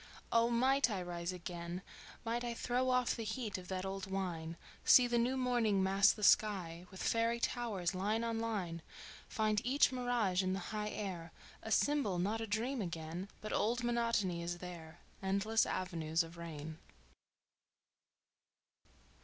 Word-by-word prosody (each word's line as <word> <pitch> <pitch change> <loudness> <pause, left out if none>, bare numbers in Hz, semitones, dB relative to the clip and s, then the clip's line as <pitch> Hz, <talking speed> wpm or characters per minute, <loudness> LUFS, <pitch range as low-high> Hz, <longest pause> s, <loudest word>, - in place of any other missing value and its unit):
Oh, 230 0 +4
might 260 +3 +3
I 205 -4 -1
rise 175 0 -3
again! 175 0 -6 0.4
Might 235 +1 -1
I 240 -1 -2
Throw 250 +2 0
off 250 -1 +2
the 230 - -4
heat 220 -2 -3
of 180 - -11
that 185 0 -3
old 195 0 -4
wine, 170 -4 -3 0.3
See 250 - +8
the 240 -1 +2
new 250 +3 +1
morning 235 -6 +2
mass 195 +2 +5
the 210 - -7
sky 180 -6 +3
With 190 - -7
fairy 230 +1 +2
towers, 210 -8 -1
line 210 +5 0
on 230 -1 -1
line; 195 -8 -2 0.5
Find 215 -1 +1
each 270 +4 +4
mirage 245 -7 +1
in 185 0 0
the - - -1 0.2
high 210 0 -1
air 180 -6 -5 0.3
A 220 - -6
symbol, 280 -9 +2
not 205 +6 0
a 225 - -3
dream 230 +5 -1
again... 170 +1 -4
But 215 - -4
old 240 +3 +1
monotony 230 -7 +1
is 175 +1 -3
there: 175 -2 -9 0.2
Endless 200 +3 +2
avenues 165 -3 0
of 165 +1 -11
rain." 160 -2 -7
200 Hz, 155 wpm, -35 LUFS, 175-235 Hz, 0.5 s, See